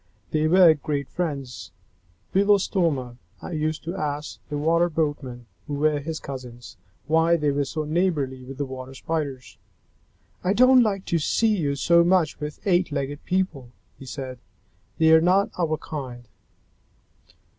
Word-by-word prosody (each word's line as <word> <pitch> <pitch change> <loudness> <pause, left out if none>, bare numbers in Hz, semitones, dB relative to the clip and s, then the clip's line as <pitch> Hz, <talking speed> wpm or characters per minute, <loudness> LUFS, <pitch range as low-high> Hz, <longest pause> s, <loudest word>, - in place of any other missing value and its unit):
They 155 0 +1
were 175 -1 +7
great 145 -2 -3
friends. 140 -7 -4 0.6
Belostoma 180 - +2 0.4
used 155 0 -2
to 170 +3 -4
ask 150 -3 -4
the 150 - -3
Water 165 +3 +2
Boatmen, 145 -6 -3 0.2
who 145 - -3
were 150 0 +1
his 155 +2 -5
cousins, 125 -4 -9 0.3
why 165 +2 +3
they 150 -2 +1
were 140 0 0
so 155 +3 -3
neighborly 150 -5 -1
with 130 +1 -9
the 145 - -2
Water 130 0 -8
Spiders. 140 -4 -4 0.8
"I 185 +2 +2
don't 255 +3 +6
like 200 -4 0
to 170 - 0
see 220 +8 +2
you 145 -7 -1
so 170 +4 +4
much 175 -4 +2
with 150 0 -7
eight 180 -3 +2
legged 140 0 -4
people," 160 -10 -2 0.3
he 135 - -11
said. 130 -2 -6 0.6
"They 160 0 +5
are 160 - +7
not 185 +4 +3
our 155 -2 +1
kind." 125 -7 -7
155 Hz, 145 wpm, -24 LUFS, 140-170 Hz, 0.8 s, were